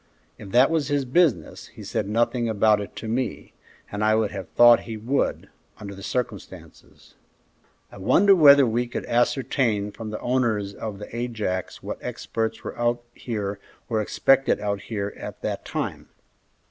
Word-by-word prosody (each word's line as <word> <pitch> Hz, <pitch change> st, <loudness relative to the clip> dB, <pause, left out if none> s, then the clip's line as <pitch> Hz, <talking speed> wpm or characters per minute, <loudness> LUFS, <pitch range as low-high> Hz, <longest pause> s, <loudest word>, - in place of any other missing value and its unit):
"If 100 Hz, -, -9 dB
that 125 Hz, +8 st, +4 dB
was 160 Hz, -4 st, 0 dB
his 145 Hz, -2 st, 0 dB
business, 150 Hz, +1 st, +1 dB
he -, -, -12 dB
said 105 Hz, -, -3 dB
nothing 120 Hz, +2 st, +1 dB
about 105 Hz, -1 st, +3 dB
it 100 Hz, -, -8 dB
to 110 Hz, -, -7 dB
me, 120 Hz, +2 st, -3 dB, 0.4 s
and 105 Hz, +1 st, -3 dB
I 110 Hz, 0 st, +4 dB
would 110 Hz, -2 st, 0 dB
have 95 Hz, -3 st, -7 dB
thought 120 Hz, 0 st, +7 dB
he 110 Hz, -, -4 dB
would, 125 Hz, +6 st, -1 dB, 0.3 s
under 100 Hz, -1 st, -7 dB
the 100 Hz, -, -11 dB
circumstances." 120 Hz, -2 st, -6 dB, 0.8 s
"I -, -, -12 dB
wonder 195 Hz, -, +5 dB
whether 140 Hz, -5 st, +8 dB
we 120 Hz, +1 st, 0 dB
could 120 Hz, -, -5 dB
ascertain 120 Hz, -4 st, 0 dB
from 110 Hz, +1 st, -8 dB
the 110 Hz, -, -5 dB
owners 115 Hz, -6 st, 0 dB
of 105 Hz, -1 st, -6 dB
the 105 Hz, +3 st, -9 dB
Ajax 110 Hz, -6 st, -3 dB
what -, -, -5 dB
experts 110 Hz, 0 st, -4 dB
were -, -, -6 dB
out 120 Hz, 0 st, 0 dB
here 105 Hz, -4 st, -4 dB, 0.3 s
or 110 Hz, -2 st, +1 dB
expected 135 Hz, +5 st, +2 dB
out 100 Hz, -1 st, -2 dB
here 100 Hz, -2 st, -4 dB
at -, -, -8 dB
that -, -, -3 dB
time?" -, -, -4 dB
115 Hz, 165 wpm, -24 LUFS, 105-125 Hz, 0.8 s, whether